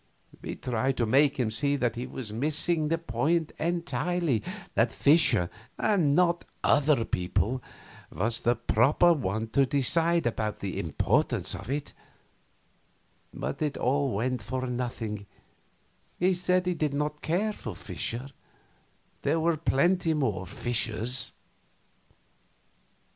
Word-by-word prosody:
We - - -5
tried 125 +2 -1
to 120 - +2
make 140 +5 +3
him 115 -3 +1
see 140 +5 +1
that 120 -4 0
he 120 +2 -4
was 110 -5 -6
missing 155 +5 +1
the 165 +2 +1
point 160 +3 0
entirely; 170 -4 0 0.3
that - - +2
Fischer, 145 - +4 0.3
and 175 -10 +2
not 175 0 +3 0.2
other 145 -4 +3
people, 105 +8 -1 0.5
was 115 +8 -1
the 120 0 +2
proper 125 +9 +4
one 110 - -2
to 135 +3 +3
decide 165 +5 +2
about 110 -3 -1
the 100 -2 -4
importance 80 -4 0
of - - -7
it; 145 +1 -3 1.4
but 70 - -5
it 150 -2 -1
all 135 -2 +1
went 125 +2 -1
for 130 +5 -3
nothing; 120 -5 -4 0.9
he 185 +2 +3
said 180 0 +1
he 180 - +1
did 150 -4 -1
not 150 +1 -2
care 200 +7 0
for 110 - -7
Fischer 120 +9 -5 0.9
there 165 - +1
were 165 +1 +2
plenty 165 +2 +2
more 105 -11 -1
Fischers. 120 +2 -2
135 Hz, 125 wpm, -28 LUFS, 115-160 Hz, 1.4 s, Fischer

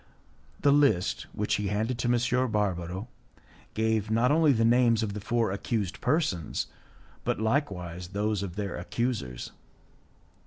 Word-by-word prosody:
The 145 - +5
list, 140 -11 +2
which 105 - 0
he 105 -1 -2
handed 110 +5 -1
to 120 - 0
M. 125 +1 +2
Barbaro, 95 -1 -1 0.7
gave 110 -1 +1
not 115 +4 +3
only 155 -1 +5
the 115 -3 +3
names 115 -1 +4
of 100 -2 -2
the 105 - -5
four 115 0 0
accused 100 -1 -2
persons, 125 - 0 0.6
but - - -1
likewise 95 - -1
those 105 +2 -1
of 95 -3 -5
their 100 -3 -3
accusers. 90 - -3
110 Hz, 140 wpm, -28 LUFS, 100-120 Hz, 0.7 s, The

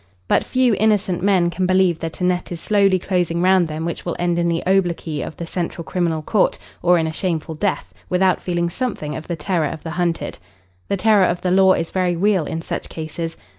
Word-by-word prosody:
But - - +3
few 255 -2 +2
innocent 205 -4 +2
men 185 -3 +3
can 185 +1 -1
believe 185 -3 +3
that 165 -1 -5
a - - 0
net 180 0 0
is 170 - -4
slowly 200 0 +3
closing 175 -2 -1
round 185 -2 +4
them 155 +1 -4
which 170 - -4
will 175 - -3
end 175 -1 0
in 170 0 +1
the 170 0 -1
obloquy 175 -5 0
of - - -6
the 170 - -5
Central 170 0 -4
Criminal 165 -3 -1
Court, 210 +4 +2 0.2
or 175 0 +4
in 165 - +1
a 160 - -3
shameful 165 -2 -2
death, 185 +5 -2 0.2
without 185 0 +2
feeling 170 -1 -1
something 210 - -3
of 160 - -7
the 170 - -2
terror 160 0 0
of 150 - -7
the 165 - -5
hunted. 175 -1 -2 0.5
"The 200 - 0
terror 210 -1 +4
of 175 -1 -1
the 180 - 0
law" 190 0 +6
is 165 - -2
very 180 -2 +1
real 190 -2 +2
in 165 0 -4
such - - -5
cases. 165 +1 -5
175 Hz, 220 wpm, -20 LUFS, 165-190 Hz, 0.5 s, law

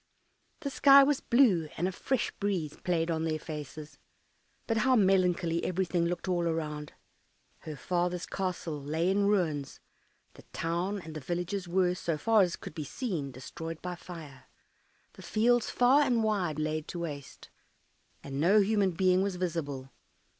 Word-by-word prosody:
The 280 -3 -3
sky 275 +1 +7
was 285 0 +2
blue, 215 - +3
and 175 - 0
a - - -2
fresh 250 +5 -1
breeze 185 -7 -1
played 170 -2 -1
on 160 -1 -1
their 160 -1 0
faces; 155 -1 -8 0.7
but 225 - 0
how 255 +4 +3
melancholy 180 -5 +2
everything 175 -2 0
looked 175 +2 -3
all 175 -2 +1
around! 150 -2 -3 0.7
Her 155 - -7
father's 180 +4 -1
castle 175 -5 -3
lay 160 +6 0
in 200 +1 +2
ruins, 160 -9 0 0.5
the - - -14
town 175 +5 -2
and 160 -2 -9
the - - -3
villages 175 +5 -3
were, 180 0 +2
so 170 -3 -2
far 225 +5 +4
as 175 -2 +1
could - - -10
be 155 -2 -5
seen, 160 - -4
destroyed 160 +5 -7
by 180 0 -3
fire, 155 -7 -10 0.7
the - - -13
fields 240 +2 +2
far 255 +4 +4
and 245 -5 +2
wide 190 -8 0
laid 155 0 -2
to 175 - -6
waste, 145 -5 -7 0.7
and 135 0 -5
no 190 +8 +5
human 200 -2 +2
being 185 +1 +3
was 195 -1 -1
visible. 150 -7 -3
175 Hz, 160 wpm, -30 LUFS, 155-200 Hz, 0.7 s, sky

